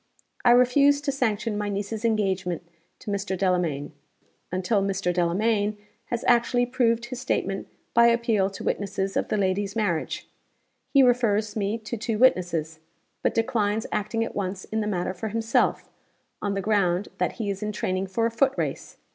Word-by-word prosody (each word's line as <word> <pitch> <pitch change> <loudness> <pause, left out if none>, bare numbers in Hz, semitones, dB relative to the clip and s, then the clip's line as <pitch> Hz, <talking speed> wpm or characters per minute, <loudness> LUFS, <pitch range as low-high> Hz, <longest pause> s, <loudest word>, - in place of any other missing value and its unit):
I 245 - +5
refuse 250 +4 +5
to 290 -1 -1
sanction 225 -5 -1
my 205 0 -2
niece's 205 +2 -3
engagement 190 -6 0 0.3
to 210 - -5
Mr. 200 -1 -2
Delamayn, 175 -7 0 0.6
until 185 +3 +1
Mr. 195 -2 0
Delamayn 205 +4 +1 0.3
has 235 0 -3
actually 245 0 +3
proved 235 -2 +1
his 250 0 -6
statement 195 -5 -1 0.3
by 235 0 +6
appeal 235 -4 +2
to 195 - -9
witnesses 195 -1 -2
of - - 0
the - - 0
lady's 195 +1 0
marriage. 190 -8 -1 0.6
He 275 -2 +6
refers 225 -4 +2
me 210 +1 -1
to 230 +1 -6
two 225 0 -2
witnesses; 175 -9 +2 0.4
but - - 0
declines 225 -2 0
acting 220 +2 -1
at - - -7
once 190 -1 -3
in 220 0 -2
the 210 - -2
matter 185 -2 -1
for 190 +4 -5
himself, 225 +2 +1 0.5
on 200 -1 -1
the 195 - -1
ground 195 -2 +1
that - - 0
he 215 -4 -2
is 195 +1 -6
in 210 0 -2
training 190 -2 -2
for 225 +5 0
a 230 - +1
foot 265 +4 +2
race. - - -3
210 Hz, 170 wpm, -25 LUFS, 190-230 Hz, 0.6 s, by